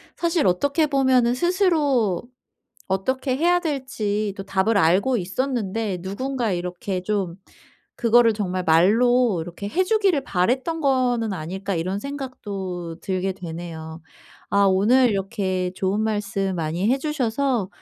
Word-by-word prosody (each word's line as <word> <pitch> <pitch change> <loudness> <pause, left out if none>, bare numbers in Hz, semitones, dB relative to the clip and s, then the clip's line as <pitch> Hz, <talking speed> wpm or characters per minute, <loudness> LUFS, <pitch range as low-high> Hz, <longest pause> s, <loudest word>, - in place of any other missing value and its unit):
사실 340 -2 0
어떻게 285 - +2
보면은 260 -4 +3
‘스스로 295 - +1 0.7
어떻게 260 +7 -1
해야 350 +4 +3
될지 255 - -2
또 195 - -6
답을 200 +3 +1
알고 195 +9 +3
있었는데 215 -1 -2
누군가 235 +4 -2
이렇게 180 +1 -3
좀 195 -3 -2 0.6
그거를 235 -1 +4
정말 185 -3 -2
말로 215 +5 +4
이렇게 175 +4 -7
해 355 - +1
주기를 385 -8 +2
바랬던 260 - 0
거는 250 -6 +1
아닐까.‘ 190 +3 -4
이런 185 +4 -2
생각도 200 - -6
들게 190 0 -2
되네요. 165 -2 -8 0.5
아 200 0 +4
오늘 220 +6 +4
이렇게 190 -2 -2
좋은 195 +2 -1
말씀 205 -3 -1
많이 165 +4 -1
해 265 - +2
주셔서 265 -6 -1
210 Hz, 275 characters per minute, -23 LUFS, 185-260 Hz, 0.7 s, 그거를